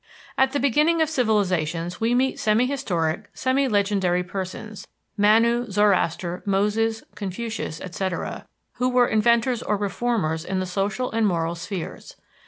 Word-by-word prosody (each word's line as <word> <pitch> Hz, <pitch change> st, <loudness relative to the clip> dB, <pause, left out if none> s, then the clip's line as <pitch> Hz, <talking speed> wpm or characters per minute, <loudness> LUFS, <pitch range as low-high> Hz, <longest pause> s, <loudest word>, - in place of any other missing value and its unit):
At 265 Hz, 0 st, +3 dB
the 285 Hz, -, 0 dB
beginning 300 Hz, +5 st, +3 dB
of 315 Hz, -2 st, +2 dB
civilizations 185 Hz, -, 0 dB
we 230 Hz, +2 st, +2 dB
meet 260 Hz, +1 st, +1 dB
semi 215 Hz, +3 st, +3 dB
historic, 200 Hz, -, -2 dB
semi 265 Hz, +1 st, +1 dB
legendary 195 Hz, -5 st, +1 dB
persons 190 Hz, +3 st, -6 dB, 0.3 s
Manu, 230 Hz, +3 st, +3 dB
Zoroaster, 185 Hz, -3 st, +1 dB
Moses, 210 Hz, +3 st, 0 dB
Confucius, 205 Hz, -4 st, -5 dB
etc., 185 Hz, 0 st, -4 dB, 0.3 s
who 250 Hz, +1 st, +1 dB
were 250 Hz, -1 st, +4 dB
inventors 235 Hz, +2 st, +2 dB
or 210 Hz, -, 0 dB
reformers 200 Hz, -5 st, -1 dB
in 190 Hz, +1 st, -2 dB
the 185 Hz, -, -1 dB
social 200 Hz, +7 st, -2 dB
and 225 Hz, -1 st, +2 dB
moral 170 Hz, -3 st, 0 dB
spheres. 175 Hz, +1 st, -7 dB
210 Hz, 135 wpm, -24 LUFS, 185-240 Hz, 0.3 s, were